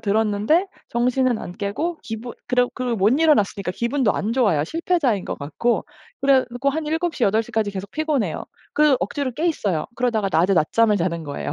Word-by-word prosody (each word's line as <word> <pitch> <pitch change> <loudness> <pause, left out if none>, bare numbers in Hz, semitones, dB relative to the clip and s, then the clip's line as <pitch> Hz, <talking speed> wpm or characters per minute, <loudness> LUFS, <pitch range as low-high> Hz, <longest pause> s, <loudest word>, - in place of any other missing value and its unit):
들었는데 220 - +2 0.2
정신은 250 0 +1
안 175 - -7
깨고 300 - -3
기분 225 +2 -6 0.2
그러 250 0 +3
그 255 - -4
못 195 +2 +3
일어났으니까 205 - +2
기분도 235 +1 +1
안 220 +3 -1
좋아요 200 - +2
실패자인 305 - 0
것 - - -4
같고. 195 +12 -1 0.4
그래 275 -1 +5
갖고 255 +4 0
한 310 +1 -3
7 325 +2 -1
시, - - -5
8 215 +3 +2
시까지 215 -2 -1
계속 195 0 -6
피곤해요. 295 - -1 0.3
그 300 -3 +4
억지로 255 +7 -2
깨 315 +7 -1
있어요. 195 - 0
그러다가 230 -5 0
낮에 180 +4 +3
낮잠을 210 +7 +3
자는 170 -2 -1
거예요. 145 0 -4
230 Hz, 380 characters per minute, -22 LUFS, 200-275 Hz, 0.4 s, 그래